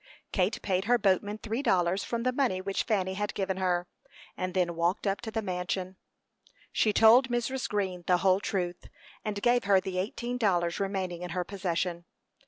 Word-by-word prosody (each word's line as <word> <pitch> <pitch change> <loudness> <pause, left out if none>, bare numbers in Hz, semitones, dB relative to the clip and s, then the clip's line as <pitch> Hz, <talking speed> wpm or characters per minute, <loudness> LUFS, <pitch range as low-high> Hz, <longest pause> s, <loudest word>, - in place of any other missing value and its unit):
Kate 190 +2 +1
paid 190 0 0
her 245 +2 +4
boatman 205 0 +1
three 225 +4 -3
dollars 185 -6 +2
from 235 -1 -3
the 255 - +2
money 250 -9 +1
which 195 +1 -2
Fanny 190 -5 0
had 205 +2 -3
given 190 -1 -1
her, 180 -2 0 0.5
and 185 0 -4
then 175 -2 +1
walked 170 +5 0
up 195 0 0
to 235 - -5
the 220 0 -2
mansion. 185 0 -3 0.8
She 215 - +2
told 230 +5 +6
Mrs. 240 +2 -1
Green 190 -4 -2
the 180 - +4
whole 185 +1 +3
truth, 180 -4 -3 0.4
and 210 -2 -3
gave 245 -1 +3
her 200 -1 +5
the 185 -1 -3
eighteen 240 +5 -3
dollars 175 -6 +1
remaining 190 -3 -2
in 180 - -5
her 180 - +1
possession. 175 -2 -2
195 Hz, 185 wpm, -29 LUFS, 180-220 Hz, 0.8 s, told